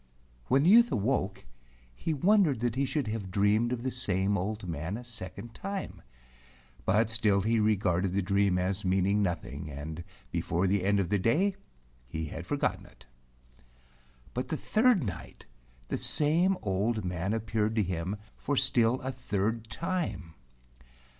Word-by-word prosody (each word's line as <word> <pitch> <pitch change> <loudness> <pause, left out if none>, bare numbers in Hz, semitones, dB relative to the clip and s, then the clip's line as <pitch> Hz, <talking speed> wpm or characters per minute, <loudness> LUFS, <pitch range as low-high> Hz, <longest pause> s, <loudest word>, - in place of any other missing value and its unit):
When 135 +2 +3
the 175 - +5
youth 235 +2 +7
awoke, 105 - -1 0.5
he 65 - -3
wondered 165 - +3
that 120 -2 0
he 135 +3 0
should 140 0 -1
have 105 -3 -4
dreamed 105 +5 +2
of 120 -1 -3
the 130 - -1
same 100 -5 0
old 100 +1 -3
man 80 +5 -3
a 125 - -8
second 110 -1 -7
time, 195 -1 -5 0.9
but 105 +4 +3
still 105 -3 +2
he 115 +3 +2
regarded 100 -4 +2
the 100 0 +1
dream 100 -1 +2
as 95 +2 -1
meaning 95 +2 +2
nothing, 75 -6 -3
and 75 +4 -6 0.3
before 85 +1 0
the 95 0 +1
end 100 0 +3
of 90 -3 0
the 105 - +2
day 160 - +2 0.5
he 80 +4 -4
had 80 +3 -7
forgotten 145 +4 -1
it. - - -20 1.3
But 125 - -2
the 155 - -2
third 220 - +3
night 90 -7 -7 0.4
the - - -2
same 170 +6 +3
old 105 +2 0
man 90 +2 -2
appeared 110 0 -1
to 110 - +3
him 90 +2 -3 0.2
for 145 0 -2
still 125 -1 +3
a 130 - -3
third 115 -2 -2
time. 160 - -3
105 Hz, 155 wpm, -29 LUFS, 95-125 Hz, 1.3 s, youth